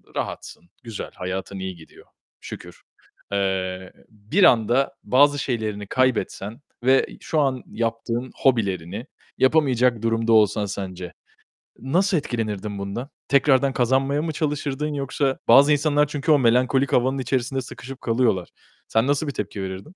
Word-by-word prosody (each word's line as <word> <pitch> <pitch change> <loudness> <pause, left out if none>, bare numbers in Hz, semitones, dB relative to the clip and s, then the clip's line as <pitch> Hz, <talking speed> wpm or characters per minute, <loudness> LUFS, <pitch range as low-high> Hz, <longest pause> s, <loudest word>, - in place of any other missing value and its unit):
rahatsın, 85 - -6
güzel, 115 -3 -7
hayatın 95 +1 -5
iyi 95 -1 -5
gidiyor, 80 -2 -17 0.4
şükür. - - -10 0.5
Eee, 95 -2 -2 0.2
bir 110 - -1
anda 125 +4 +4
bazı 145 +2 +4
şeylerini 110 -6 -3
kaybetsen 120 -2 -1 0.2
ve 130 +1 +4 0.2
şu 155 - -1
an 135 -3 0
yaptığın 115 +2 -3
hobilerini 100 -4 0 0.3
yapamayacak 130 -5 +3
durumda 115 0 +1
olsan 105 -1 +4
sence, 95 -3 -6 0.7
nasıl 180 +8 +1
etkilenirdin 105 -7 -3
bundan? 100 +8 -5 0.2
Tekrardan 140 -1 +3
kazanmaya 135 +4 +1
mı 160 -1 -2
çalışırdın 150 -1 -2
yoksa 135 0 -1
bazı 140 +2 +7
insanlar 150 0 +2
çünkü 145 +2 0
o 145 - +6
melankolik 130 +2 +2
havanın 130 +2 +2
içerisinde 130 +1 -1
sıkışıp 130 +2 -10
kalıyorlar. 115 -6 +1 0.4
Sen 110 +3 +2
nasıl 145 +2 +1
bir 140 - -3
tepki 100 -3 -5
verirdin? 95 0 -5
125 Hz, 130 wpm, -23 LUFS, 105-140 Hz, 0.7 s, bazı